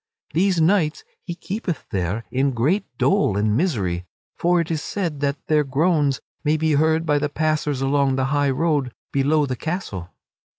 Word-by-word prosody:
These 180 +2 +2
knights 165 -2 +2 0.2
he 175 - -6
keepeth 185 - -4
there 95 +4 -1
in 135 +1 +1
great 150 - +1
dole 195 - +2
and 105 +1 +1
misery, 95 - -1 0.3
for 175 +1 +2
it 165 -1 -1
is 155 -2 -1
said 170 -8 -3
that 140 -1 -2
their 155 -1 +3
groans 145 0 +1 0.2
may 155 0 +2
be 160 0 +1
heard 160 +2 +2
by 145 -2 +2
the 145 0 -1
passers 150 -2 0
along 135 -1 +2
the 130 0 0
high 145 -1 +2
road 140 -3 0 0.2
below 145 +2 +2
the 130 -2 -3
castle. 125 - -4
150 Hz, 170 wpm, -22 LUFS, 135-165 Hz, 0.3 s, their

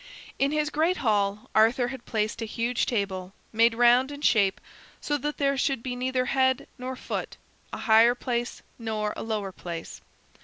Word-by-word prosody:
In 275 +1 +2
his 305 0 0
great 325 +4 +1
hall 205 -1 +1
Arthur 240 +3 +4
had 265 -2 -9
placed 215 0 -1
a - - -1
huge 235 +2 -1
table, 195 -4 -2 0.2
made 230 +1 +4
round 245 +3 +4
in 285 0 -8
shape 200 -9 +3 0.4
so 295 - -1
that 295 +2 -3
there 275 -1 +1
should 270 -5 0
be 250 -1 -3
neither 255 0 -1
head 260 0 +2
nor 255 +1 -4
foot, - - -5 0.3
a - - -5
higher 230 +2 +5
place 240 -1 -3 0.2
nor 215 -2 -2
a - - -6
lower 210 -3 -3
place. 170 -2 -7
240 Hz, 175 wpm, -27 LUFS, 215-260 Hz, 0.4 s, higher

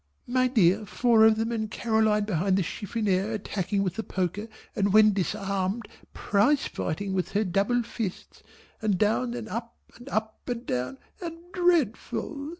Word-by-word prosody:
My 255 +1 +2
dear 210 -3 +3
four 230 +1 +4
of 220 0 +6
them 225 +1 -1
and 220 -2 -2
Caroline 220 -2 +2
behind 190 -1 +1
the 195 - +2
chiffoniere 205 +2 -1
attacking 200 -1 -1
with 185 -1 -3
the 225 - -2
poker 190 +3 -2 0.3
and 200 0 +1
when 215 0 +6
disarmed 195 +2 -2 0.2
prize 230 +8 +2
fighting 190 +4 -3
with 185 -1 -2
her 205 +2 +2
double 205 +6 +1
fists, 225 -5 -6 0.4
and 210 -4 +1
down 225 +4 +1
and 235 -2 -5
up 230 +1 -5 0.2
and 245 +3 -11
up 220 -2 -2
and 240 0 -3
down 125 - -2 0.2
and 335 -2 -5 0.2
dreadful! 310 - 0
215 Hz, 155 wpm, -27 LUFS, 195-235 Hz, 0.4 s, of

